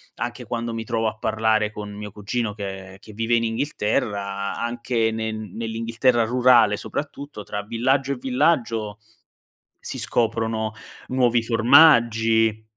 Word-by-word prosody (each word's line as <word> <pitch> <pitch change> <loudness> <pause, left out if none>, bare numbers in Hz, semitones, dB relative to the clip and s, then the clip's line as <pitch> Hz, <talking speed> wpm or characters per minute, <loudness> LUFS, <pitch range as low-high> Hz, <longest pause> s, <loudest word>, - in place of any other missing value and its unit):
anche - - -5
quando 115 -1 -3
mi 115 0 -4
trovo 110 0 -1
a 110 0 -4
parlare 110 -1 +1
con 105 -1 -7
mio 105 0 -7
cugino, 105 +2 -3
che 95 -2 -7
che 105 +1 -14
vive 115 +2 0
in 115 0 +1
Inghilterra, 105 -5 -2
a - - -4
anche 120 -1 -1
ne 110 0 -3
nell'Inghilterra 115 +3 -1
rurale 120 -3 +4
soprattutto, 140 -5 -6
tra 105 +1 -5
villaggio 130 +6 0
e - - 0
villaggio 125 -6 0 0.8
si - - -6
scoprono 110 -1 -1 0.3
nuovi 125 -2 +2
formaggi, 115 -3 +4
115 Hz, 130 wpm, -23 LUFS, 105-120 Hz, 0.8 s, rurale